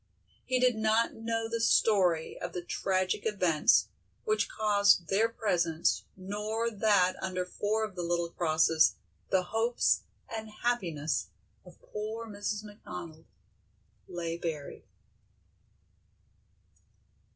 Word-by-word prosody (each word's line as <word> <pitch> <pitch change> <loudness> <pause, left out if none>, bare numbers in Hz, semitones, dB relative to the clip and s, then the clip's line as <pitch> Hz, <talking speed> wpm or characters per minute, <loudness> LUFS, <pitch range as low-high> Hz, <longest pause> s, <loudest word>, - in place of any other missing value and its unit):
He 255 -1 +1
did 250 -2 +3
not 220 +1 +2
know 225 0 -2
the 230 0 -2
story 185 -8 +3
of 175 -1 -4
the 175 - -4
tragic 185 +2 0
events 180 -8 +3 0.4
which 430 +2 +1
caused 200 - +3
their 215 +4 +3
presence 175 -8 0
nor 210 +4 -2
that 200 -4 +3
under 185 -1 -2
four 210 +4 -1
of 215 -2 -4
the 180 - -5
little 170 0 -1
crosses 160 -1 +3 0.3
the 190 -1 +2
hopes 225 +5 +1 0.3
and 220 -1 -6
happiness 170 -11 0 0.4
of - - -16
poor 220 +2 -5
Mrs. 205 0 -4
McDonald 180 -6 -9 0.8
lay 170 -1 -4
buried. 155 -4 -5
200 Hz, 110 wpm, -30 LUFS, 175-220 Hz, 0.8 s, did